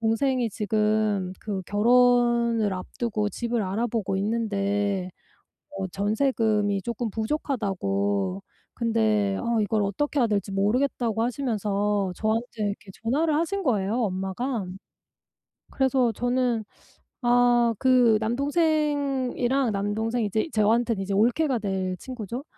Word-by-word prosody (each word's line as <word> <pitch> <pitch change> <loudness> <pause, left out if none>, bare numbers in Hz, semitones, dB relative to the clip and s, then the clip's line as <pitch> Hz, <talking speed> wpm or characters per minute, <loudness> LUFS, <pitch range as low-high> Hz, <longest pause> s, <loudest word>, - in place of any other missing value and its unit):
동생이 235 +2 +1
지금 210 -2 0
그 200 -3 -4
결혼을 235 0 +3
앞두고 210 +3 -3
집을 235 0 -2
알아보고 210 0 -1
있는데 200 -2 -1 0.6
어 190 -10 -4
전세금이 210 0 0
쪼끔 235 0 -3
부족하다고 140 - -1 0.3
근데 220 -4 +1
어 235 -2 0
이걸 210 0 +1
어떻게 285 +10 -1
해야 245 - +4
될지 205 -2 -1
모르겠다고 225 +2 0
하시면서 210 -6 -1
저한테 220 +2 0 0.2
이렇게 200 -1 -4
전화를 295 +7 +1
하신 390 +5 -1
거예요 210 - 0
엄마가. 195 +4 -2 1.1
그래서 260 -3 +2
저는 245 0 0 0.6
아 240 -1 +4
그 250 -4 +4
남동생이랑 275 -2 0
남동생 220 +4 -1
이제 215 - -1
저한테는 220 0 +2
이제 195 +1 -4
올케가 245 +6 +2
될 190 -3 -2
친구죠. 245 +2 -6
225 Hz, 270 characters per minute, -25 LUFS, 205-245 Hz, 1.1 s, 해야